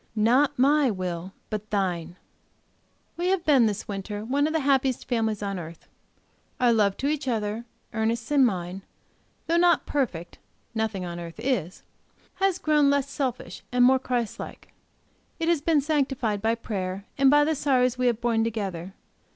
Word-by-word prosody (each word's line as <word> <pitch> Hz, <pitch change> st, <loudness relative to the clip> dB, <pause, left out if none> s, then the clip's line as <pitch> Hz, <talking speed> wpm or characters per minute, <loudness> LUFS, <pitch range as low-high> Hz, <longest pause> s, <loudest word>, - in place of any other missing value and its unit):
Not 245 Hz, +6 st, +3 dB
my 280 Hz, +2 st, +4 dB
will! 185 Hz, -3 st, -4 dB, 0.2 s
But 215 Hz, 0 st, -4 dB
Thine!" 180 Hz, -4 st, -1 dB, 1.0 s
We 350 Hz, +1 st, -1 dB
have 370 Hz, -2 st, +1 dB
been, 270 Hz, -7 st, +5 dB
this 210 Hz, 0 st, -3 dB
winter, 205 Hz, +1 st, -5 dB
one 280 Hz, +5 st, +1 dB
of 315 Hz, -, -3 dB
the 320 Hz, -, +1 dB
happiest 270 Hz, -2 st, +1 dB
families 220 Hz, -4 st, -1 dB
on 195 Hz, -2 st, -3 dB
earth. 165 Hz, 0 st, -10 dB, 0.7 s
Our 245 Hz, -2 st, +4 dB
love 205 Hz, -3 st, +2 dB
to 275 Hz, -, -1 dB
each 295 Hz, -2 st, -1 dB
other, 220 Hz, -1 st, -2 dB, 0.3 s
Ernest's 230 Hz, +2 st, -1 dB
and 285 Hz, -2 st, +5 dB
mine, 185 Hz, -4 st, -1 dB, 0.6 s
though 335 Hz, -, +1 dB
not 345 Hz, -2 st, +4 dB
perfect 180 Hz, -, -3 dB, 0.3 s
nothing 220 Hz, -4 st, -2 dB
on 175 Hz, 0 st, -6 dB
earth 170 Hz, -1 st, -8 dB
is 200 Hz, -, -2 dB, 0.5 s
has 385 Hz, -2 st, +2 dB
grown 300 Hz, -4 st, +3 dB
less 280 Hz, 0 st, +1 dB
selfish, 270 Hz, -4 st, -3 dB
more 250 Hz, +1 st, +5 dB
Christ 245 Hz, -4 st, -2 dB
like; -, -, -9 dB, 0.7 s
it 325 Hz, -, -1 dB
has 335 Hz, -4 st, +2 dB
been 310 Hz, -1 st, +3 dB
sanctified 270 Hz, -8 st, 0 dB
by 225 Hz, +2 st, +1 dB
prayer 195 Hz, -4 st, -4 dB
and 275 Hz, -1 st, +6 dB
by 295 Hz, +1 st, +6 dB
the 315 Hz, +2 st, +1 dB
sorrows 255 Hz, -4 st, +1 dB
we 250 Hz, -, +2 dB
have 235 Hz, -2 st, +1 dB
borne 230 Hz, -2 st, +1 dB
together. 195 Hz, -5 st, -4 dB
235 Hz, 165 wpm, -26 LUFS, 200-280 Hz, 1.0 s, and